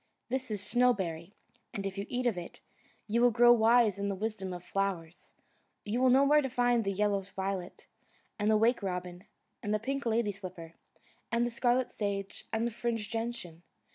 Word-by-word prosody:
This 260 0 -2
is 205 -2 -3
Snowberry, 200 -8 +1 0.4
and 200 -2 -3
if 195 -1 -3
you 200 0 -4
eat 250 +1 -2
of 235 -5 +2
it, 175 -1 -8 0.5
you 230 +2 +1
will 245 - +6
grow 240 +1 +6
wise 225 -3 +4
in 200 0 -1
the 200 - -2
wisdom 200 -2 -4
of 175 -1 -7
flowers. 180 -4 -3 0.6
You 225 +4 -1
will 260 - +5
know 265 +2 +6
where 295 +2 +5
to 265 - -2
find 245 -1 +2
the 195 - -1
yellow 200 0 +1
violet, 190 -1 -5 0.5
and 210 +1 +1
the 215 - +5
wake 230 +3 +3
robin, 180 -1 -4 0.4
and 210 -3 -3
the - - 0
pink 275 +3 -3
lady 225 -2 +1
slipper, 180 -4 -9 0.6
and 235 +1 +2
the 240 - -2
scarlet 245 +1 +1
sage, 200 -2 -4
and 225 +1 0
the 235 - -1
fringed 230 -2 -3
gentian. 225 -8 -4
215 Hz, 190 wpm, -31 LUFS, 195-240 Hz, 0.6 s, will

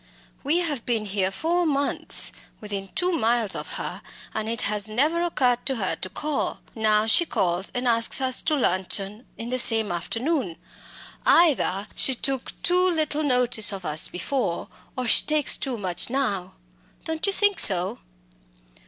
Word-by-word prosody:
We 295 +5 +1
have 295 -9 -2
been 225 -3 -1
here 195 -2 -1
four 335 - -1
months, 285 -3 -1 0.3
within 200 -2 -6
two 360 +1 0
miles 235 - 0
of - - -6
her, - - -5 0.3
and 220 0 -3
it 230 0 -1
has 210 0 +1
never 300 +10 +1
occurred 255 -8 0
to 265 - 0
her 195 -5 -2
to 185 - -6
call. 295 +9 -3
Now 215 -1 +2
she 225 +10 +4
calls 180 - -1
and 245 0 -1
asks 230 +1 +3
us 260 -1 +1
to 310 - 0
luncheon 195 -1 0
in 230 +1 -6
the 255 +1 -1
same 225 -4 +4
afternoon. 225 - -2 0.7
Either 275 - +3
she 265 - 0
took 265 +1 -4
too 360 +1 +3
little 310 -4 0
notice 250 -6 +2
of 195 -2 -7
us 155 0 +1
before, 180 0 -3 0.3
or 255 - -2
she 230 - +4
takes 305 -2 +2
too 260 -4 -3
much 185 -2 0
now 220 -9 -2 0.5
don't 320 +3 -2
you - - +2
think 410 0 +2
so?" 185 -2 +5
240 Hz, 160 wpm, -24 LUFS, 205-295 Hz, 0.7 s, so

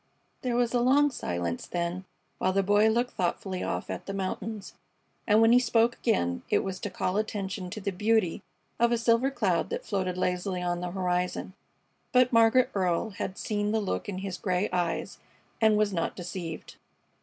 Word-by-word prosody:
There 250 -3 -1
was 240 -1 +1
a 245 - +3
long 280 +4 +4
silence 85 - -3
then, 175 +2 -3 0.3
while 185 - +1
the 195 0 +2
Boy 205 +2 +4
looked 240 +3 +1
thoughtfully 185 0 -2
off - - -3
at - - -6
the 195 - -4
mountains, 200 +2 -4 0.5
and 215 0 +5
when 225 0 +6
he 245 - +7
spoke 235 -1 +3
again 85 - 0
it - - +2
was 190 -1 -4
to 205 - -4
call 185 +1 -1
attention 200 -3 -3
to 215 - -6
the 200 0 -2
beauty 210 -1 +1 0.4
of 235 0 +4
a 235 - +3
silver 230 +3 +3
cloud 275 - 0
that 485 +1 -4
floated 185 -3 -2
lazily 180 0 -1
on 175 0 -1
the 180 - -3
horizon. 180 0 -2 0.6
But 250 0 +4
Margaret 230 +2 +5
Earle 185 +2 0
had 190 0 -5
seen 205 -1 -1
the 220 - +2
look 205 0 -3
in 190 - -4
his 190 -1 -5
gray 185 -1 0
eyes 175 -2 -1 0.4
and 220 -1 +5
was 210 -1 +2
not 165 -2 -1
deceived. 175 -2 -6
200 Hz, 185 wpm, -28 LUFS, 180-225 Hz, 0.6 s, he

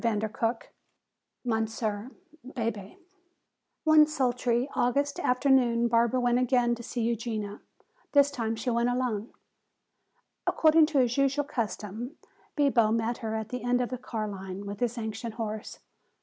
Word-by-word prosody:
CHAPTER 220 -2 0
XI 230 0 -1 0.8
Monsieur 220 -1 -1 0.3
Bebé 230 - -4 0.9
One 310 -1 +6
sultry 250 -4 0
August 280 +4 +1
afternoon 250 -2 +3
Barbara 235 +2 +3
went 245 0 +2
again 245 -1 +2
to 235 - -5
see 235 0 -3
Eugenia. 225 -3 -3 0.5
This 285 0 +5
time 225 -4 -2
she 225 +3 -2
went 235 +1 +2
alone. 245 -3 -1 1.2
According 315 -1 +5
to 310 -2 -1
his 245 -1 +2
usual 275 +1 +2
custom 235 0 -4 0.4
Bibo 255 -7 +3
met 230 +1 0
her 220 -1 -3
at 220 -1 -4
the 250 +1 -4
end 245 +1 +1
of 245 - -1
the 255 - -5
car 225 -4 -4
line 195 0 -6
with 200 0 -6
his 245 0 -1
ancient 220 0 -4
horse. 220 -2 -5
235 Hz, 140 wpm, -28 LUFS, 220-255 Hz, 1.2 s, One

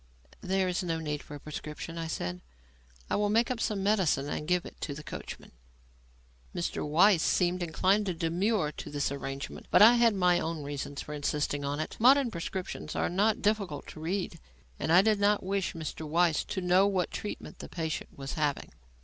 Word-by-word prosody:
"There 190 0 +1
is 180 -1 -1
no 165 -2 -1
need 150 -2 -3
for 145 - -10
a - - -8
prescription," 150 +2 -7
I 165 - -3
said. 90 - -4 0.7
"I - - 0
will 205 0 +1
make 230 +4 +2
up 250 - -2
some 210 -4 -1
medicine 190 -9 +2
and 150 - -4
give 180 0 +1
it - - -12
to 145 - -3
the 150 - -8
coachman." - - -8 1.0
Mr. - - -2
Weiss 170 +4 +5
seemed 180 +1 +1
inclined 190 +5 +2
to 180 - -1
demur 170 +1 0
to - - -8
this 145 -1 -1
arrangement, 135 0 -6
but - - +7
I 235 +3 +8
had 230 -3 +4
my 180 -2 +3
own 160 -2 -3
reasons 140 0 -5
for 150 - -7
insisting 145 0 -1
on 140 +1 -2
it. 155 - -4
Modern 260 +1 +5
prescriptions 180 +1 -5
are - - 0
not 210 +6 +1
difficult 205 -8 0
to - - -10
read, 170 +1 -3 0.4
and - - -1
I 180 +3 +7
did 215 -1 +3
not 205 0 +3
wish 195 0 -1
Mr. 160 -1 -5
Weiss 165 0 +2
to 190 - -3
know 180 +2 +4
what 190 -3 0
treatment 210 - -6
the - - -8
patient 160 -2 -3
was 135 0 -5
having. 150 -3 -1
175 Hz, 195 wpm, -30 LUFS, 150-200 Hz, 1.0 s, I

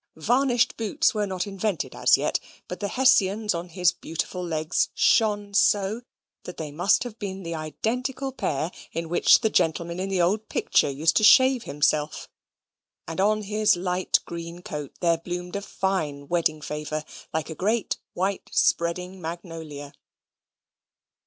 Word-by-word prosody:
Varnished 245 - +2
boots 285 +9 +1
were 210 -2 -1
not 185 0 -2
invented 200 -3 -3
as - - +4
yet; - - 0 0.3
but 180 - -6
the 205 - -2
Hessians 220 -4 +3
on 170 +1 -5
his 180 0 +2
beautiful 180 +1 -5
legs 160 -1 0
shone 205 -2 +2
so, 205 +2 +2 0.4
that 180 - -8
they 155 -2 -5
must 175 +8 +2
have 235 -3 -9
been 195 -2 -5
the 170 0 -4
identical 250 - -3
pair 160 - -2 0.2
in 165 0 -4
which 175 - +5
the 220 - +2
gentleman 170 0 0
in 190 +1 -2
the 190 -2 0
old 205 +5 +1
picture - - +2
used 155 +4 +1
to - - +2
shave 260 +2 +6
himself; 150 +1 0 0.8
and 165 +3 -2
on 215 +1 +2
his 210 +1 +2
light 180 +1 +1
green 170 +1 -7
coat 150 -3 -6
there 170 -2 +2
bloomed 180 +1 -5
a 200 - -2
fine 160 -9 -2
wedding 160 -2 0
favour, 150 +1 -4 0.3
like 160 +1 -3
a - - -3
great 210 +7 -1 0.2
white 190 +2 -2
spreading 180 +2 0
magnolia. 160 -4 -7
180 Hz, 150 wpm, -25 LUFS, 165-210 Hz, 0.8 s, shave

